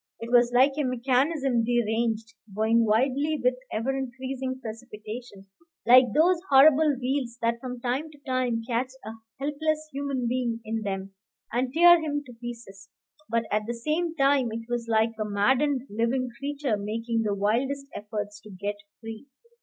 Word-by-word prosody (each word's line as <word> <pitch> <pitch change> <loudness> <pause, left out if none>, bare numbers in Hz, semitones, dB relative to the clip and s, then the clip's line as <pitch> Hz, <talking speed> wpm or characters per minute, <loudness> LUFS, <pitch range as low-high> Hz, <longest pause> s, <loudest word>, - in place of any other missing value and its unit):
It 230 +1 -7
was 240 -1 +5
like 260 +3 +5
a - - +2
mechanism 260 0 +1
deranged, 225 -1 0 0.2
going 225 +2 +3
wildly 270 +7 +1
with 250 +1 +4 0.2
ever 235 +5 -1
increasing 260 0 -4
precipitation, 220 -2 -8 0.4
like 250 +2 +8
those 340 - +3
horrible 290 +1 +6
wheels 255 -2 -2
that 230 0 +1
from 250 -1 -6
time 260 +5 -2
to 300 - -17
time 255 -3 0
catch 255 +2 -1
a 220 - -5 0.3
helpless 310 +2 -1
human 275 -3 -2
being 240 -2 -1
in 220 0 -2
them 195 -2 -4 0.4
and 250 +1 0
tear 345 +3 +7
him 290 -2 -2
to 250 - -12
pieces; 230 -5 -9 0.4
but 230 +1 +1
at 210 +1 0
the 235 - -2
same 320 +7 -1
time 275 -4 +3
it 225 +1 -6
was 240 -1 -3
like 225 0 +2
a - - +1
maddened 250 +7 +1
living 235 +4 -1
creature 280 -5 -1
making 225 +3 -2
the 210 -2 0
wildest 250 +8 0
efforts 205 -1 -5
to 215 - -14
get 205 +2 -4 0.2
free. 225 +3 -8
245 Hz, 160 wpm, -26 LUFS, 225-275 Hz, 0.4 s, like